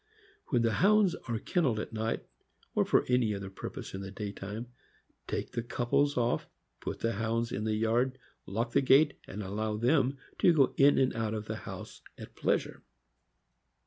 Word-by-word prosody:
When 120 -4 +2
the 115 - +3
Hounds 200 - +4
are 115 -2 -1
kenneled 130 -3 0
at 110 - -5
night, 110 +1 -2 0.5
or - - +2
for - - +3
any 115 -5 +2
purpose - - -7
in 95 - -5
the 95 - -6
day 100 +1 -5
time, 105 +4 -6 0.6
take - - -3
the 120 - -2
couples 125 +4 +1
off, 120 -1 +1 0.3
put - - -5
the 115 - +1
Hounds 115 +2 -1
in 105 - -2
the 110 -1 +1
yard, 120 +4 +1 0.3
lock 115 +5 -2
the - - +4
gate, 140 +3 +5
and 105 +2 -5
allow 105 +2 -2
them 135 +3 +2 0.2
to 175 - +6
go 140 -5 +4
in 140 +1 +6
and 130 -2 +2
out 110 -1 -1
of 105 0 -4
the - - -4
house - - -8 0.2
at - - -11
pleasure. - - 0
115 Hz, 175 wpm, -31 LUFS, 110-130 Hz, 0.6 s, to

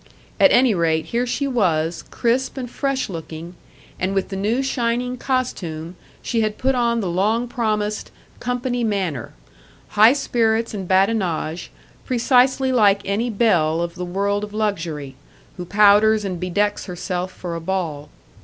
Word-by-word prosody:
At 290 - +6
any 245 -2 +5
rate, 160 -3 +1
here 240 +2 -1
she 280 +3 -1
was, 170 - 0
crisp 255 +3 0
and 255 -2 -4
fresh 275 +2 -2
looking; 165 -1 -7 0.5
and 190 +2 -1
with 195 - 0
the 195 - -5
new 215 +7 0
shining 245 -1 -1
costume, 180 - -3 0.3
she 230 -2 0
had 215 -1 -1
put 265 +1 +1
on 235 -2 +1
the 195 - -2
long 210 +7 +1
promised 215 -3 -2 0.3
"company 245 0 -2
manner": 190 - -2 0.6
high 215 +4 +6
spirits 230 -5 0
and 195 -3 -5
badinage, 185 -4 0 0.3
precisely 260 +1 +3
like 205 -5 +4
any 215 +5 -1
belle 175 -8 +2
of 170 0 -2
the 180 0 -6
world 200 +3 -1
of 210 0 -7
luxury, 165 -10 -2 0.4
who 180 - -5
powders 210 +2 +5
and 185 -3 -3
bedecks 205 +4 -1
herself 180 0 -4
for 175 -2 -6
a 165 - -5
ball. 165 -5 -3
205 Hz, 150 wpm, -21 LUFS, 180-240 Hz, 0.6 s, At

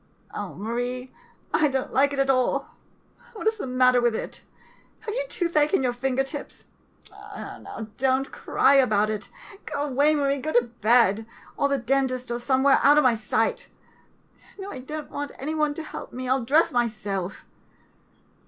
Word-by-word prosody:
] - - -30
Oh, 205 -3 -5
Marie, 245 +4 -4 0.4
I 305 - +4
don't 265 -2 -2
like 280 +1 +3
it 280 - -4
at 275 0 +3
all. 255 -1 0 0.6
What 430 - -7
is 440 0 +2
the 330 - -5
matter 255 -1 +4
with 240 -2 +2
it? - - -6 0.6
Have 430 - -5
you - - -1
toothache 335 -2 +2
in 265 - +1
your 250 -1 +1
finger 265 +2 0
tips? 280 +1 -8 0.5
Now 220 - -9
don't 265 +1 +1
cry 275 - +2
about 215 -5 +3
it. 210 -1 -5 0.4
Go 290 -2 -2
away, 290 +2 +2
Marie, 280 -1 +1
go 310 +4 -3
to 240 - +5 0.2
bed, 220 -1 +4 0.3
or 280 - +1
to 280 - +1
the 245 - -8
den 270 +2 +2
tist, 255 -1 -5
or 240 - -3
somewhere 265 +2 +3
out 290 +1 +6
of 300 - +5
my 255 -2 +5
sight. 220 0 -1 0.9
No, 395 0 -7
I 260 - -7
don't 300 +4 -7
want 285 0 -5
any 300 +4 -3
one 300 -2 0
to 320 - -5
help - - -8
me, 255 +1 -5
I - - 0
'11 260 -2 +1
dress 310 +5 +4
myself. 210 -6 -2
265 Hz, 185 wpm, -25 LUFS, 240-290 Hz, 0.9 s, out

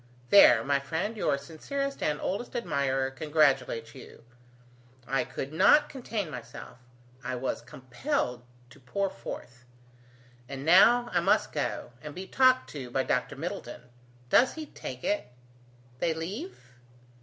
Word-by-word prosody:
There, 120 - +8
my 140 +1 +1
friend, 165 +10 -3
your 170 -9 +1
sincerest 275 - -5
and 150 -1 0
oldest 200 +6 -4
admirer 135 - 0
congratulates 135 -6 +1
you. 130 - -13 0.8
I 135 -2 +1
could 135 +4 -6
not 295 - +5
contain 225 - -4
myself; 125 0 -9 0.4
I 130 +1 -3
was 125 -1 -3
compelled 125 - -3 0.3
to - - -16
pour 190 +10 -2
forth. 120 +1 -9 0.9
And 135 0 -6
now 235 +8 +6
I 175 - +4
must 170 - +2
go - - -3
and 150 +1 -8
be 185 - -6
talked 255 +4 +3
to 135 -4 -7
by 130 +2 0
Dr. 125 +3 -1
Middleton. 160 -4 -6 0.5
How - - +8
does 255 - +1
he 315 -1 -6
take 130 - -8
it? 205 -10 -1 0.7
They 165 +3 0
leave?" 200 - -5
150 Hz, 140 wpm, -28 LUFS, 130-205 Hz, 0.9 s, There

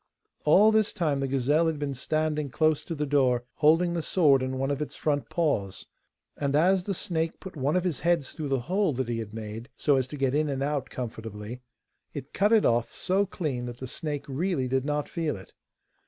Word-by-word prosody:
All 200 +8 +6
this 220 -1 +2
time 150 -5 0
the 135 - -1
gazelle 140 +5 +2
had 160 -2 -1
been 145 -1 -2
standing 150 +2 -1
close 155 +3 +2
to 165 - -4
the 150 0 -1
door, 130 -4 +2
holding 165 +3 +4
the 170 - -1
sword 150 -6 +4
in 130 0 -2
one 135 +1 0
of 140 +1 -2
its 150 - -4
front 145 -2 -1
paws. 140 - -1 0.5
And 140 -1 -1
as 180 +4 +3
the 195 - -1
snake 165 -1 -2
put 190 -1 -9
one 145 +2 0
of 180 - +2
his 175 -7 -1
heads 170 -4 +1
through 155 -3 -5
the 135 -2 0
hole 185 +4 +1
that 130 -1 -2
he 120 -1 -2
had 110 -2 -6
made 110 +2 -7
so 145 -2 +3
as 130 -1 0
to 150 - -7
get 135 -1 +1
in 150 +1 +1
and 135 -1 -1
out 145 -2 -1
comfortably, 110 -1 -6 0.5
it 145 0 -7
cut 205 +2 +2
it 225 -2 +5
of 120 0 +2
so 195 +2 0
clean 135 -10 -3
that 120 0 -7
the 130 - -6
snake 145 +2 -4
really 140 -1 -1
did 130 +1 0
not 150 0 -1
feel 160 - -2
it. 95 - -14
145 Hz, 220 wpm, -27 LUFS, 130-165 Hz, 0.5 s, All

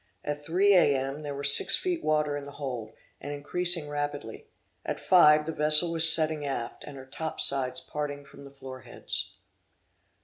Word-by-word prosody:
At 145 0 -5
three 185 +6 +2
A. 170 -6 +3
M. 135 +3 -5
there 145 -2 -7
were 140 - -7
six 140 0 +7
feet 355 -2 -4
water 150 -1 0
in 145 -1 -7
the 140 - -11
hold, 125 -7 -7 0.3
and 145 - -8
increasing 165 +3 0
rapidly; 145 -5 -6 0.4
at - - -5
five 150 -4 +4
the 160 - -4
vessel 150 +2 +2
was 165 -1 +4
setting 155 -2 +1
aft, 135 -4 -6
and 145 -2 -11
her 130 - -11
top 160 +4 -7
sides 135 -2 -1
parting 145 -1 -6
from 140 - -15
the 140 - -12
floor 135 -1 -11
heads. - - -4
145 Hz, 180 wpm, -26 LUFS, 140-155 Hz, 0.4 s, six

